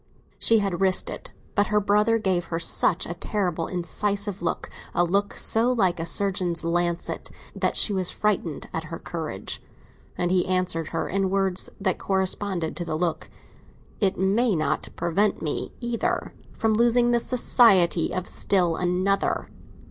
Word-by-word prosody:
She 230 Hz, -, +4 dB
had 195 Hz, -4 st, -1 dB
risked 190 Hz, -1 st, +3 dB
it, -, -, -8 dB, 0.2 s
but 205 Hz, 0 st, +2 dB
her 210 Hz, 0 st, +2 dB
brother 210 Hz, +3 st, +2 dB
gave 190 Hz, -5 st, 0 dB
her 165 Hz, -, -3 dB
such 165 Hz, -, +2 dB
a 170 Hz, -, -4 dB
terribly 175 Hz, -2 st, -2 dB
incisive 200 Hz, +2 st, -2 dB
look—a 175 Hz, 0 st, -3 dB
look 200 Hz, +4 st, 0 dB
so 230 Hz, +3 st, +3 dB
like 190 Hz, -8 st, +1 dB
a 165 Hz, -, -3 dB
surgeon's 180 Hz, -4 st, +2 dB
lancet—that 170 Hz, 0 st, -2 dB
she 210 Hz, -, +6 dB
was 185 Hz, -2 st, +1 dB
frightened 185 Hz, -8 st, -1 dB
at 160 Hz, 0 st, -3 dB
her 165 Hz, +2 st, -6 dB
courage. 160 Hz, -, -5 dB, 0.6 s
And 175 Hz, 0 st, 0 dB
he 185 Hz, -1 st, +2 dB
answered 185 Hz, -3 st, 0 dB
her -, -, -3 dB
in 195 Hz, 0 st, 0 dB
words 190 Hz, -1 st, 0 dB
that 190 Hz, -2 st, 0 dB
corresponded 190 Hz, -3 st, -1 dB
to 175 Hz, -, -2 dB
the 160 Hz, -2 st, -3 dB
look: 170 Hz, -1 st, -2 dB, 0.7 s
"It 195 Hz, -3 st, +1 dB
may 205 Hz, +4 st, +2 dB
not 155 Hz, -2 st, -1 dB
prevent 200 Hz, +5 st, 0 dB
me, 150 Hz, -, -2 dB
either, 240 Hz, +10 st, -2 dB, 0.2 s
from 225 Hz, -1 st, +1 dB
losing 240 Hz, +2 st, +3 dB
the 240 Hz, -, +3 dB
society 215 Hz, -9 st, +3 dB
of 185 Hz, -1 st, -3 dB
still 175 Hz, -4 st, +1 dB
another." 185 Hz, +2 st, 0 dB
190 Hz, 150 wpm, -25 LUFS, 175-210 Hz, 0.7 s, she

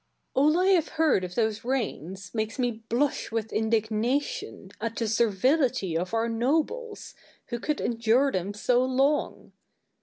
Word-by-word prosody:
Douglas. 295 Hz, +4 st, +4 dB
All -, -, +2 dB
I 365 Hz, -, +2 dB
have 350 Hz, -5 st, +4 dB
heard 315 Hz, -11 st, +2 dB
of 180 Hz, 0 st, -6 dB
those 220 Hz, -1 st, 0 dB
reigns 200 Hz, -, -3 dB
makes 220 Hz, +1 st, -2 dB
me 245 Hz, -2 st, +1 dB
blush 230 Hz, +6 st, -2 dB
with 225 Hz, -1 st, -3 dB
indignation 225 Hz, -, -1 dB
at 230 Hz, 0 st, -3 dB
the 230 Hz, -, -1 dB
servility 230 Hz, -, +1 dB
of 180 Hz, +2 st, -1 dB
our 225 Hz, +1 st, +1 dB
nobles, 315 Hz, -, -1 dB, 0.4 s
who 240 Hz, -, -3 dB
could 300 Hz, +4 st, -2 dB
endure 235 Hz, +4 st, +2 dB
them 190 Hz, 0 st, -3 dB
so 245 Hz, +4 st, +2 dB
long. 270 Hz, +3 st, 0 dB
235 Hz, 150 wpm, -27 LUFS, 220-275 Hz, 0.4 s, Douglas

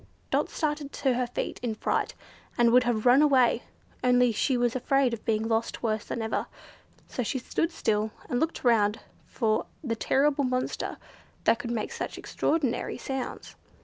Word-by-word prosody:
Dot -, -, +1 dB
started 295 Hz, -2 st, -2 dB
to 265 Hz, -2 st, +1 dB
her 250 Hz, 0 st, 0 dB
feet 245 Hz, -, -4 dB
in 235 Hz, -3 st, -2 dB
fright, -, -, -1 dB, 0.4 s
and 235 Hz, -1 st, +5 dB
would 250 Hz, +1 st, +5 dB
have 235 Hz, -2 st, 0 dB
run 250 Hz, +3 st, +7 dB
away, 260 Hz, -5 st, +4 dB, 0.4 s
only 250 Hz, -1 st, +4 dB
she 250 Hz, +4 st, +1 dB
was 240 Hz, 0 st, +1 dB
afraid 260 Hz, 0 st, +2 dB
of 225 Hz, -, -5 dB
being 220 Hz, 0 st, +1 dB
lost 225 Hz, +1 st, -1 dB
worse 215 Hz, -2 st, 0 dB
than 230 Hz, -, -3 dB
ever, 220 Hz, -, -1 dB, 0.6 s
so -, -, -3 dB
she 245 Hz, +3 st, -1 dB
stood 325 Hz, +6 st, -1 dB
still 215 Hz, -7 st, 0 dB, 0.2 s
and 245 Hz, -, 0 dB
looked 320 Hz, +3 st, -1 dB
round 220 Hz, -4 st, +3 dB, 0.3 s
for 220 Hz, -3 st, 0 dB, 0.2 s
the 230 Hz, -5 st, -1 dB
terrible 280 Hz, +5 st, +2 dB
monster 255 Hz, -1 st, -2 dB, 0.5 s
that 230 Hz, -, +3 dB
could 235 Hz, -, -5 dB
make 230 Hz, -3 st, -2 dB
such -, -, -5 dB
extraordinary 295 Hz, -7 st, -1 dB
sounds. 265 Hz, -2 st, -5 dB
245 Hz, 170 wpm, -28 LUFS, 225-265 Hz, 0.6 s, run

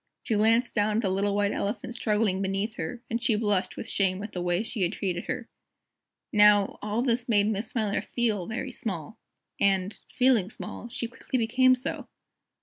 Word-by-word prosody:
She -, -, -1 dB
glanced 225 Hz, +3 st, +3 dB
down 210 Hz, -1 st, +1 dB
at 225 Hz, -, +2 dB
the 190 Hz, -, +1 dB
little 200 Hz, +1 st, 0 dB
White 205 Hz, 0 st, +1 dB
Elephant 230 Hz, +4 st, -3 dB
struggling 210 Hz, -4 st, +1 dB
beneath 195 Hz, +3 st, -1 dB
her, 245 Hz, -1 st, -5 dB
and 230 Hz, +1 st, -2 dB
she 235 Hz, -2 st, +2 dB
blushed 205 Hz, -3 st, 0 dB
with -, -, -5 dB
shame 190 Hz, 0 st, +1 dB
at 210 Hz, -, -6 dB
the 180 Hz, -, -4 dB
way 175 Hz, +3 st, 0 dB
she 225 Hz, -2 st, -4 dB
had 180 Hz, +2 st, +1 dB
treated 180 Hz, -4 st, -3 dB
her. 250 Hz, -2 st, -4 dB, 0.9 s
Now, 205 Hz, -1 st, +5 dB
all 210 Hz, +3 st, -1 dB
this 245 Hz, -1 st, 0 dB
made 205 Hz, -3 st, +4 dB
Miss 210 Hz, +2 st, -2 dB
Smiler 215 Hz, -6 st, -1 dB
feel 215 Hz, -7 st, -1 dB
very 240 Hz, +4 st, -4 dB
small. 190 Hz, -6 st, -5 dB, 0.4 s
And, 195 Hz, 0 st, +1 dB
feeling 250 Hz, -7 st, +3 dB
small, 235 Hz, -, -7 dB
she 235 Hz, -, -3 dB
quickly 255 Hz, +2 st, -4 dB
became 255 Hz, +3 st, +4 dB
so! 255 Hz, +2 st, -4 dB
210 Hz, 185 wpm, -27 LUFS, 200-235 Hz, 0.9 s, Now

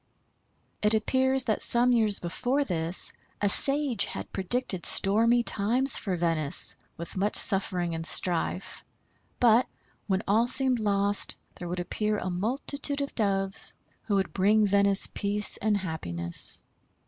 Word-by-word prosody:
It 210 Hz, +1 st, +2 dB
appears 260 Hz, +4 st, +1 dB
that 220 Hz, -4 st, -2 dB
some 240 Hz, +1 st, +3 dB
years 220 Hz, -4 st, +2 dB
before 250 Hz, +11 st, -2 dB
this 170 Hz, -5 st, 0 dB, 0.3 s
a 205 Hz, -, 0 dB
sage 275 Hz, 0 st, +2 dB
had -, -, -8 dB
predicted 195 Hz, -1 st, -2 dB
stormy 230 Hz, +4 st, +2 dB
times 240 Hz, +7 st, +1 dB
for 190 Hz, -4 st, -2 dB
Venice, 165 Hz, -4 st, +1 dB, 0.2 s
with 170 Hz, -, -8 dB
much 200 Hz, +2 st, -1 dB
suffering 185 Hz, -4 st, +2 dB
and 165 Hz, 0 st, -5 dB
strife, 175 Hz, +2 st, -3 dB, 0.6 s
but, 240 Hz, +1 st, +3 dB, 0.4 s
when 190 Hz, 0 st, -1 dB
all 220 Hz, +4 st, +2 dB
seemed 260 Hz, -1 st, +2 dB
lost, 200 Hz, -1 st, 0 dB, 0.2 s
there 175 Hz, -, -9 dB
would 180 Hz, +1 st, -5 dB
appear 210 Hz, +4 st, -2 dB
a 185 Hz, -2 st, -4 dB
multitude 275 Hz, +9 st, -2 dB
of 280 Hz, -, -5 dB
Doves, 195 Hz, -3 st, -1 dB, 0.3 s
who 205 Hz, -, -1 dB
would 195 Hz, -1 st, -2 dB
bring 210 Hz, +3 st, +2 dB
Venice 200 Hz, 0 st, +3 dB
peace 205 Hz, +1 st, +4 dB
and 210 Hz, -1 st, 0 dB
happiness. 85 Hz, -, -3 dB
205 Hz, 135 wpm, -26 LUFS, 185-240 Hz, 0.6 s, peace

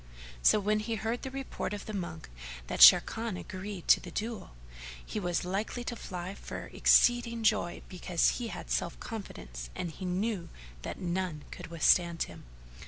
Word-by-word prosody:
So 215 Hz, -, +6 dB
when 210 Hz, +1 st, +1 dB
he 225 Hz, +2 st, -2 dB
heard 225 Hz, +2 st, -2 dB
the 265 Hz, -, -5 dB
report 270 Hz, -5 st, -4 dB
of 205 Hz, -, -8 dB
the 215 Hz, -, -6 dB
monk 170 Hz, -5 st, -5 dB, 0.4 s
that -, -, -4 dB
Sharrkan 225 Hz, -4 st, +7 dB
agreed 190 Hz, -1 st, -7 dB
to -, -, +8 dB
the 180 Hz, -, -9 dB
duello, 220 Hz, +5 st, -4 dB, 0.6 s
he -, -, -4 dB
was 175 Hz, -2 st, -1 dB
like 195 Hz, +4 st, -2 dB
to 245 Hz, 0 st, -4 dB
fly 180 Hz, -3 st, -6 dB
for -, -, -8 dB
exceeding 235 Hz, -1 st, +4 dB
joy 210 Hz, -5 st, +1 dB
because 180 Hz, +1 st, +1 dB
he 240 Hz, -, -3 dB
had -, -, -7 dB
self -, -, -1 dB
confidence 60 Hz, -, -7 dB
and 175 Hz, -, -3 dB
he 185 Hz, -, -8 dB
knew 185 Hz, +1 st, -1 dB, 0.3 s
that -, -, -5 dB
none 175 Hz, -4 st, -2 dB
could -, -, -8 dB
with 165 Hz, -1 st, -7 dB
stand 170 Hz, -2 st, +4 dB
him. -, -, -11 dB
195 Hz, 170 wpm, -31 LUFS, 175-225 Hz, 0.6 s, to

